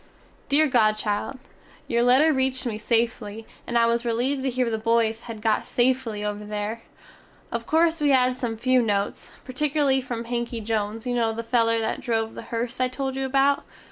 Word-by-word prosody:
Deer 305 +2 +4
godchild, 215 -1 +1 0.5
Your 235 0 +1
letter 265 +6 +5
reeched 265 -1 +1
me 220 -3 -3
safely, 225 -1 -1 0.2
and 240 - 0
I 230 - +5
was 235 0 +1
releeved 245 +4 0
to 265 - 0
here 250 -1 0
the 220 -1 -1
boys 225 0 +1
had 225 -3 -8
got 220 -2 +2
safely 240 -4 0
"over 210 0 -3
there." 210 +2 -4 0.7
Of 235 0 -3
corse 325 0 +2
we 295 - +3
have 255 -2 +4
had - - -6
some 230 -3 -3
few 255 +2 +3
notes, 205 -3 -2 0.2
pertikerly 275 0 +1
from 240 -2 -4
Hanky 235 0 -3
Jones 220 0 -2
you 250 - -1
no 230 -2 +1
the 230 +1 -5
feller 230 -1 +2
that 220 - -2
drove 225 -2 -1
the - - -7
hearse 235 +1 -3
I 255 - +2
tole 265 +1 -3
you 270 0 -2
about. 275 +1 +2
235 Hz, 190 wpm, -24 LUFS, 225-260 Hz, 0.7 s, letter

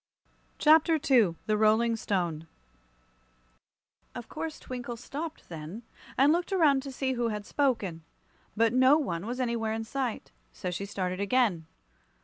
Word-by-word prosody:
Chapter 320 +1 +5
II 245 - +3
The 215 - +1
Rolling 220 +2 +3
Stone 175 -7 -2 1.7
OF 240 -2 -7
course 315 0 -5
Twinkle 245 -2 -6
stopped 295 +6 -7
then, 165 +7 -8 0.3
and 275 +3 +5
looked 350 +2 -1
around 305 -8 +4
to 275 0 -7
see 260 0 -1
who 240 -1 0
had 210 -2 -4
spoken. 220 - 0 0.6
But 230 +1 +3
no 260 +3 +6
one 190 - -3
was 245 +2 -4
anywhere 235 -3 -1
in 225 0 -3
sight. 250 0 -4 0.2
So 180 - -5
she 195 +3 -4
started 185 -2 -3
on - - 0
again. 200 -9 +1
235 Hz, 145 wpm, -29 LUFS, 200-270 Hz, 1.7 s, no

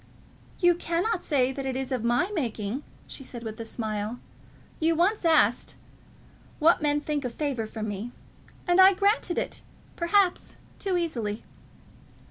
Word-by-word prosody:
"You 350 -2 +5
cannot 345 +4 -1
say 265 -4 +2
that 270 0 -4
it 260 - -2
is 265 0 -3
of 250 -4 -1
my 240 - +1
making," 235 - -2 0.2
she 270 - -9
said, 240 -2 -9
with 220 -1 -6
a 230 - -5
smile. 220 0 -4 0.6
"You 325 +1 +2
once 375 +6 +2
asked 320 -2 +3 0.8
what 325 +2 +4
men 295 -1 +1
think 295 -1 -2
a 250 - -2
favour 250 -4 -3
from 215 0 -5
me; 210 +3 -5 0.6
and 355 +1 +5
I 380 +1 +8
granted 400 -2 +1
it, - - -2 0.3
perhaps 360 +2 +1 0.2
too 380 -3 0
easily." 230 -11 -2
285 Hz, 150 wpm, -27 LUFS, 235-345 Hz, 0.8 s, I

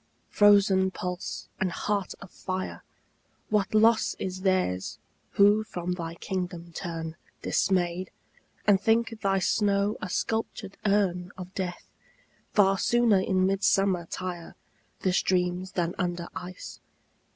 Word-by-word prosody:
frozen 200 -2 +5
pulse 180 -1 -5
and 185 -1 0
heart 200 +2 -2
of 195 - -13
fire, 185 0 -5 0.7
What 210 -1 +1
loss 220 +1 +4
is 185 0 -4
theirs 185 - 0 0.4
who 205 +2 +5
from 180 -4 -4
thy 170 -2 -4
kingdom 175 -2 -5
turn 165 -2 -5 0.3
Dismayed, 180 -1 +1 0.6
and 200 -2 +5
think 225 +1 +1
thy 195 -1 +2
snow 200 +1 +1
a 185 - -4
sculptured 220 -1 -2
urn 180 -3 +1
Of 185 0 -8
death! 180 -2 -5 0.6
Far 195 -2 +4
sooner 235 -4 +4
in 185 0 +1
midsummer 195 -2 +2
tire 175 -2 -6 0.5
The 185 - +1
streams 180 0 0
than 175 -1 0
under 175 -2 -2
ice. 180 0 -8
185 Hz, 120 wpm, -27 LUFS, 180-200 Hz, 0.7 s, frozen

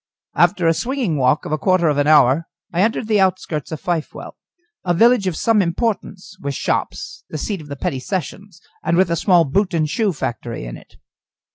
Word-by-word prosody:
After 180 -4 +2
a 165 - +5
swinging 235 - -1
walk 140 +3 +2
of - - -5
a 155 - 0
quarter 185 -2 +2
of 145 -1 +1
an 145 - +2
hour 150 +1 +5 0.3
I 175 - +1
entered 220 +1 0
the 215 -2 +2
outskirts 185 -6 -1
of 160 - -4
Fifewell, 170 -3 -4 0.5
a 175 -2 +1
village 230 +1 +4
of 180 - -1
some 225 -3 +3
importance, 195 +1 -3
with 140 -3 -3
shops, 155 +5 -3
the 155 - -5
seat 195 +4 -3
of 150 - -12
the 140 - -6
petty 135 -1 -3
sessions, 190 +3 -5 0.2
and 170 - +1
with 185 -2 +3
a - - +2
small 175 0 +4
boot 185 +6 0
and 155 -2 +1
shoe 210 +6 0
factory 120 - -5
in - - -7
it. - - -16
170 Hz, 205 wpm, -20 LUFS, 150-195 Hz, 0.5 s, a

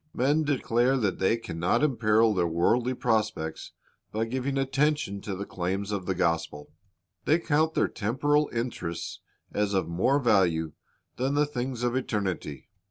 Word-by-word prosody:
Men 145 +5 +2
declare 130 -2 +2
that 105 -7 -1
they 95 +5 +2
can 85 -8 -7
not 90 - +2
imperil 110 -5 +3
their 90 -3 +1
worldly 115 +10 +1
prospects 110 -10 -1 0.4
by 110 +1 -1
giving 130 +3 -2
attention 135 -6 0
to 100 -1 -4
the 100 +2 -5
claims 95 +3 -3
of 100 -3 -3
the 95 - 0
gospel. 85 -4 -1 0.5
They 155 - +4
count 160 -1 +1
their - - +3
temporal 145 +7 +1
interests 115 -8 -4 0.3
as 105 -1 0
of 95 -4 +1
more 95 +12 +2
value 90 - +2 0.5
than 135 +3 0
the 150 +1 +3
things 125 -3 -4
of 120 0 +1
eternity. 95 - -3
115 Hz, 155 wpm, -27 LUFS, 95-135 Hz, 0.5 s, They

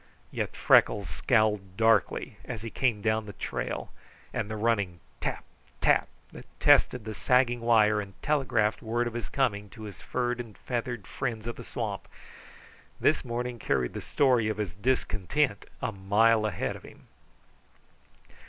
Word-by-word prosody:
Yet - - -3
Freckles 100 -3 +4
scowled 105 - +1
darkly 110 -3 +2
as 115 -4 -6
he 115 - -5
came 115 -6 0
down 110 -1 +1
the 100 - -7
trail, - - -4 0.4
and 105 - -2
the 110 - -3
running 105 -5 0 0.2
TAP, - - -3 0.4
TAP - - +3 0.2
that - - -11
tested 125 -4 +4
the 110 - -4
sagging 120 +1 +2
wire 110 -2 +4
and 100 -2 -11
telegraphed 125 -8 +1
word 120 +1 0
of 120 - -3
his 120 0 -4
coming 105 -7 0
to 110 - -11
his 105 -3 -9
furred 125 -1 -1
and 115 -4 -8
feathered 120 -4 -3
friends 115 -2 -4
of 120 - -4
the - - -9
swamp, - - -4 0.9
this - - +3
morning 120 0 -3
carried 65 -10 0
the - - -5
story 125 -6 +2
of 110 - -2
his 105 -5 -3
discontent 115 +2 0 0.2
a - - 0
mile 110 +3 +3
ahead 100 - -2
of - - -10
him. - - -15
110 Hz, 155 wpm, -28 LUFS, 105-120 Hz, 0.9 s, Freckles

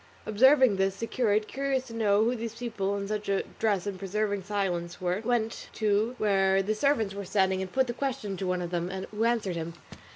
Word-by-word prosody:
Observing 260 0 +5
this 195 0 +1
the 230 - -3
curate, 215 -3 +1
curious 270 -1 -1
to 235 - -10
know 210 -2 +3
who 240 +2 +1
these 230 -1 -5
people 220 -4 -2
in 200 0 -4
such 210 -1 -3
a 195 - +1 0.2
dress 205 -4 +1
and 200 -2 -4
preserving 205 +1 -1
such 185 - -17
silence 180 -4 -2
were, 180 +2 -1
went 230 -1 -1
to 215 +3 +1
where 195 -3 +3
the 210 +3 0
servants 220 -3 +1
were 200 0 -5
standing 190 -1 +1
and 190 -1 -5
put 265 +4 +2
the 240 - -3
question 240 -7 -3
to 190 0 -3
one 180 0 0
of 175 - -5
them, 175 0 -1 0.2
who 215 +1 -1
answered 225 -6 0
him. 165 0 -4
205 Hz, 220 wpm, -28 LUFS, 195-230 Hz, 0.2 s, Observing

